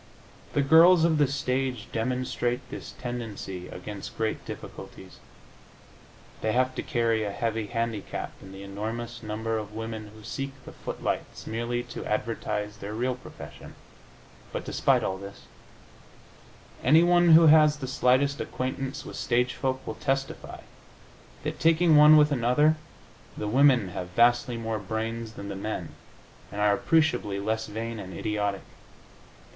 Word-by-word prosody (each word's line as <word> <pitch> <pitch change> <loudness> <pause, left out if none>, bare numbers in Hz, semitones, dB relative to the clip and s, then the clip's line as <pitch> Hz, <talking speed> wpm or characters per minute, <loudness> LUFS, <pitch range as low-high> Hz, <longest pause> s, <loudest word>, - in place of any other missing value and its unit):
The 145 - +2
girls 165 +4 +7
of 160 -2 +2
the 145 - +5
stage 130 -3 -2
demonstrate 125 +1 -1
this - - -7
tendency 110 -7 -5
against 100 +2 -8
great 110 -1 -1
difficulties. - - -9 1.2
They 110 0 0
have 130 +1 +2
to - - -3
carry 115 -4 +1
a 105 - -2
heavy 110 0 -2
handicap 115 -2 -3
in 95 - -11
the 95 0 -9
enormous 110 +4 -5
number 110 +1 -2
of 105 0 -8
women 110 -1 -5
who 110 - -13
seek 135 +5 -4
the - - -9
footlights - - -4
merely 120 +2 -2
to 120 - -7
advertise 105 -1 -2
their 105 0 -6
real 125 +3 0
profession, 125 - -11 0.8
but - - -4
despite - - +2
all 95 0 -2
this, 100 0 -10 1.4
anyone 175 +1 +6
who 165 +1 +9
has 155 -1 +6
the 140 - -5
slightest 130 +2 +2
acquaintance 130 +1 -4
with - - -8
stagefolk 130 +2 0
will - - -4
testify 135 0 -2 0.8
that, - - -4
taking 165 0 +4
one 150 +1 +9
with 150 0 +5
another, 140 +4 +3 0.6
the 105 - -3
women 125 -3 +4
have 90 0 -5
vastly 120 +5 +3
more 115 -1 -3
brains 110 +2 -4
than 100 -3 -8
the 100 - -5
men 95 -4 -4 0.6
and 100 - -6
are 105 0 +4
appreciably 125 -7 +1
less 110 +2 -2
vain 115 +1 -5
and 95 -3 -8
idiotic. 105 -2 -1
115 Hz, 140 wpm, -27 LUFS, 105-135 Hz, 1.4 s, who